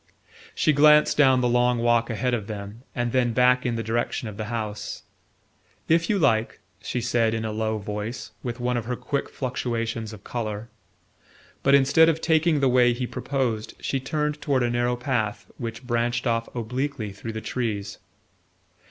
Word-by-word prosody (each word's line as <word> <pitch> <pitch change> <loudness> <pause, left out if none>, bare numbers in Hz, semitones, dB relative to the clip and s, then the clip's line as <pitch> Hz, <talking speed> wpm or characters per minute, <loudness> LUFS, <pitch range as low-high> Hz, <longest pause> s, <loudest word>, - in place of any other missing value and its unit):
She 155 - +3
glanced 150 +1 +6
down 130 -3 +5
the 125 - +2
long 120 0 +3
walk 120 0 +2
ahead 125 +2 -1
of 110 -4 -2
them 105 +1 -7
and 120 -1 -1
then 120 -2 +2
back 125 +1 +4
in 120 - -1
the 115 - -2
direction 115 +1 -1
of 105 - -7
the 110 - -4
house. 110 -2 -4 0.8
"If 165 +1 +2
you 210 - +3
like," 115 - +1 0.2
she 125 - -3
said 115 -2 +1
in 110 0 -3
a 110 - -2
low 110 0 -1
voice, 105 +3 -5
with 120 -1 -5
one 125 0 0
of 120 - -3
her 125 +1 -2
quick 140 +3 -3
fluctuations 115 -3 -3
of 105 -2 -11
colour; 110 -1 -4 0.9
but 140 0 +5
instead 140 +4 +5
of 160 -1 0
taking 160 -2 +2
the 135 - +4
way 125 -1 +4
he 125 +1 -3
proposed 120 -4 -2
she 135 - -1
turned 150 +2 -2
toward 135 -4 +1
a 120 - +1
narrow 120 +1 +1
path 120 -4 -2
which 115 0 -6
branched 120 0 0
off 115 -1 0
obliquely 125 -1 -3
through 110 +3 -7
the 110 - -4
trees. 105 -4 -3
120 Hz, 180 wpm, -25 LUFS, 110-130 Hz, 0.9 s, glanced